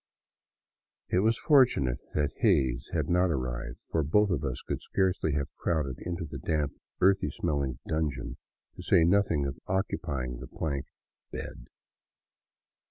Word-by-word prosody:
It 90 Hz, -, +3 dB
was 110 Hz, +3 st, +3 dB
fortunate 125 Hz, -, +4 dB, 0.2 s
that 75 Hz, -1 st, +1 dB
Hays 75 Hz, -, +2 dB
had -, -, 0 dB
not 90 Hz, +1 st, +3 dB
arrived, 65 Hz, -3 st, -3 dB
for 80 Hz, -, +2 dB
both 100 Hz, +8 st, +3 dB
of 85 Hz, -, 0 dB
us 65 Hz, -3 st, -2 dB
could -, -, -3 dB
scarcely 95 Hz, -5 st, 0 dB
have 70 Hz, 0 st, -2 dB
crowded 75 Hz, -6 st, -1 dB
into 85 Hz, -1 st, -4 dB
the 75 Hz, -, -7 dB
damp, 75 Hz, -3 st, -1 dB, 0.3 s
earthy 95 Hz, +1 st, +4 dB
smelling 70 Hz, -6 st, -1 dB
dungeon, 75 Hz, -6 st, -2 dB, 0.4 s
to -, -, -6 dB
say 85 Hz, -, +4 dB
nothing 85 Hz, -5 st, +3 dB
of 70 Hz, -2 st, -4 dB
occupying 70 Hz, -10 st, -2 dB
the -, -, -8 dB
plank 70 Hz, -4 st, -3 dB, 0.2 s
" -, -, -62 dB
bed." -, -, -7 dB
75 Hz, 145 wpm, -29 LUFS, 65-90 Hz, 0.4 s, fortunate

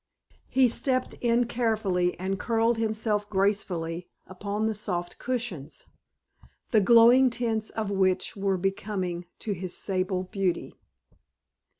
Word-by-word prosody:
He 260 Hz, 0 st, +4 dB
stepped 255 Hz, +2 st, -1 dB
in 240 Hz, 0 st, +3 dB
carefully 215 Hz, -8 st, 0 dB
and 190 Hz, +1 st, -2 dB
curled 230 Hz, 0 st, +1 dB
himself 215 Hz, -2 st, -1 dB
gracefully 180 Hz, -4 st, -1 dB, 0.2 s
upon 200 Hz, +3 st, -3 dB
the 220 Hz, -, +1 dB
soft 180 Hz, -4 st, -3 dB
cushions, 235 Hz, -, -4 dB, 0.9 s
the 215 Hz, -, +5 dB
glowing 235 Hz, +5 st, +7 dB
tints 230 Hz, -2 st, -1 dB
of 215 Hz, -2 st, -3 dB
which 190 Hz, -1 st, +1 dB
were 195 Hz, -1 st, 0 dB
very 195 Hz, +2 st, +1 dB
becoming 185 Hz, -4 st, -4 dB
to 215 Hz, -, -4 dB
his 185 Hz, -2 st, -3 dB
sable 185 Hz, -1 st, -1 dB
beauty. 185 Hz, -2 st, -2 dB
205 Hz, 120 wpm, -27 LUFS, 185-230 Hz, 0.9 s, glowing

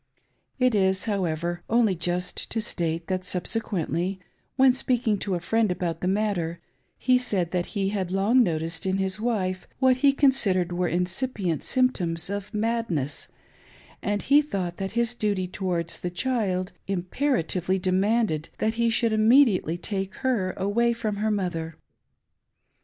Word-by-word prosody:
It 255 Hz, -2 st, +3 dB
isi 190 Hz, -1 st, +2 dB
however, 175 Hz, -2 st, -1 dB
only 225 Hz, -3 st, +3 dB
just 175 Hz, +1 st, -3 dB
to 225 Hz, -, -2 dB
state, 165 Hz, -5 st, -2 dB
that 185 Hz, 0 st, -2 dB
subsequently, 185 Hz, -1 st, -2 dB, 0.4 s
when 265 Hz, -1 st, +5 dB
speaking 245 Hz, -5 st, +1 dB
to 195 Hz, -2 st, -1 dB
a -, -, -2 dB
friend 225 Hz, +5 st, +1 dB
about 170 Hz, -2 st, -3 dB
the 180 Hz, -, -1 dB
matter, 190 Hz, -4 st, 0 dB, 0.4 s
he 255 Hz, 0 st, +3 dB
said 195 Hz, -9 st, -1 dB
that 180 Hz, -1 st, -1 dB
he 195 Hz, -1 st, +1 dB
had 190 Hz, -3 st, -2 dB
long 205 Hz, +7 st, +4 dB
noticed 165 Hz, -3 st, -1 dB
in 190 Hz, 0 st, +1 dB
his 190 Hz, +1 st, -1 dB
wife, 190 Hz, -6 st, -1 dB
what 260 Hz, -1 st, +4 dB
he 275 Hz, +2 st, +5 dB
considered 225 Hz, -11 st, +3 dB
were 175 Hz, 0 st, 0 dB
incipient 180 Hz, -, -1 dB
symptoms 190 Hz, -10 st, 0 dB
of 205 Hz, 0 st, -4 dB
madness, 210 Hz, -, -2 dB, 0.7 s
and 205 Hz, 0 st, -1 dB
he 285 Hz, +2 st, +5 dB
thought 190 Hz, -12 st, -4 dB
that 195 Hz, 0 st, -4 dB
his 235 Hz, 0 st, +1 dB
duty 205 Hz, -5 st, -1 dB
towards 175 Hz, -3 st, -2 dB
the 180 Hz, -, -3 dB
child 185 Hz, -2 st, -1 dB, 0.2 s
imperatively 190 Hz, -, 0 dB
demanded 190 Hz, -2 st, +1 dB
that 220 Hz, 0 st, 0 dB
he 235 Hz, -, +3 dB
should 225 Hz, 0 st, +2 dB
immediately 215 Hz, -, +4 dB
take 195 Hz, +1 st, -4 dB
her 205 Hz, -8 st, +1 dB
away 235 Hz, +5 st, +1 dB
from 220 Hz, -3 st, -3 dB
her 215 Hz, +2 st, 0 dB
mother. 170 Hz, -6 st, -2 dB
195 Hz, 145 wpm, -26 LUFS, 180-230 Hz, 0.7 s, when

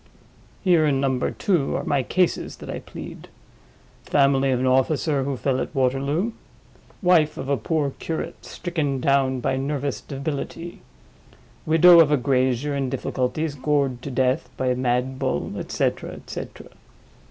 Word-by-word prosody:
Here, 175 Hz, -5 st, +4 dB
in 135 Hz, -2 st, +2 dB
Number 130 Hz, -2 st, 0 dB
Two, 175 Hz, -9 st, 0 dB
are -, -, -2 dB
my 140 Hz, -2 st, +1 dB
cases 180 Hz, +7 st, 0 dB
that -, -, -8 dB
I -, -, -4 dB
plead: -, -, -10 dB, 0.8 s
Family 135 Hz, -1 st, +3 dB
of 130 Hz, -2 st, +1 dB
an 130 Hz, -, 0 dB
officer 135 Hz, +2 st, +2 dB
who 140 Hz, -1 st, -2 dB
fell 130 Hz, +1 st, 0 dB
at -, -, -5 dB
Waterloo; 140 Hz, -, +1 dB, 0.7 s
Wife 170 Hz, -4 st, +4 dB
of 135 Hz, -, -5 dB
a 140 Hz, -, +3 dB
poor 145 Hz, +4 st, -1 dB
curate 160 Hz, -, -5 dB
stricken 155 Hz, -6 st, -3 dB
down 135 Hz, -1 st, +2 dB
by 130 Hz, -, 0 dB
nervous 140 Hz, 0 st, -2 dB
debility; 145 Hz, +4 st, -5 dB, 0.9 s
Widow 170 Hz, +2 st, +8 dB
of 155 Hz, -3 st, +6 dB
a 150 Hz, -, +4 dB
grazier 130 Hz, +1 st, +1 dB
in 135 Hz, -2 st, -1 dB
difficulties 130 Hz, +6 st, -2 dB
gored 140 Hz, -3 st, 0 dB
to 140 Hz, -, -6 dB
death 130 Hz, -1 st, 0 dB
by 130 Hz, -, 0 dB
a 125 Hz, -, +2 dB
mad 125 Hz, +1 st, -1 dB
bull; -, -, -1 dB
et -, -, -7 dB
cetera, -, -, -1 dB
et -, -, -11 dB
cetera. -, -, -7 dB
140 Hz, 155 wpm, -23 LUFS, 130-155 Hz, 0.9 s, Widow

